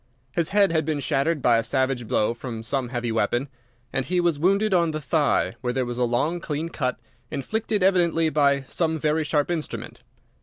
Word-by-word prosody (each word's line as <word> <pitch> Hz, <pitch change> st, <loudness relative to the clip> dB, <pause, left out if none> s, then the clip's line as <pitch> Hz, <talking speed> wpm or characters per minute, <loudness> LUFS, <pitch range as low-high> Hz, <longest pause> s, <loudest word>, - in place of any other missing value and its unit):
His 170 Hz, +3 st, 0 dB
head 200 Hz, -3 st, +4 dB
had 160 Hz, -1 st, +1 dB
been 150 Hz, -1 st, -1 dB
shattered 140 Hz, +2 st, 0 dB
by 120 Hz, -2 st, +5 dB
a -, -, -1 dB
savage 130 Hz, 0 st, 0 dB
blow 105 Hz, +2 st, +1 dB
from 115 Hz, -2 st, -7 dB
some 125 Hz, +1 st, -2 dB
heavy 120 Hz, -2 st, -2 dB
weapon, 120 Hz, +5 st, 0 dB, 0.4 s
and 135 Hz, -, 0 dB
he 180 Hz, +5 st, 0 dB
was 170 Hz, -4 st, +1 dB
wounded 195 Hz, +5 st, +2 dB
on 170 Hz, -2 st, +3 dB
the 155 Hz, -1 st, -3 dB
thigh, 150 Hz, 0 st, +1 dB
where 125 Hz, -1 st, -1 dB
there 130 Hz, -1 st, 0 dB
was 120 Hz, 0 st, -4 dB
a 125 Hz, -, +3 dB
long, 145 Hz, +9 st, 0 dB
clean 160 Hz, 0 st, -3 dB
cut, 130 Hz, -6 st, -2 dB, 0.3 s
inflicted 210 Hz, -, -1 dB
evidently 170 Hz, -4 st, +3 dB
by 140 Hz, -2 st, +3 dB
some 160 Hz, +4 st, -1 dB
very 155 Hz, +1 st, +1 dB
sharp 150 Hz, +1 st, 0 dB
instrument. 160 Hz, -3 st, -5 dB
150 Hz, 195 wpm, -24 LUFS, 125-170 Hz, 0.4 s, by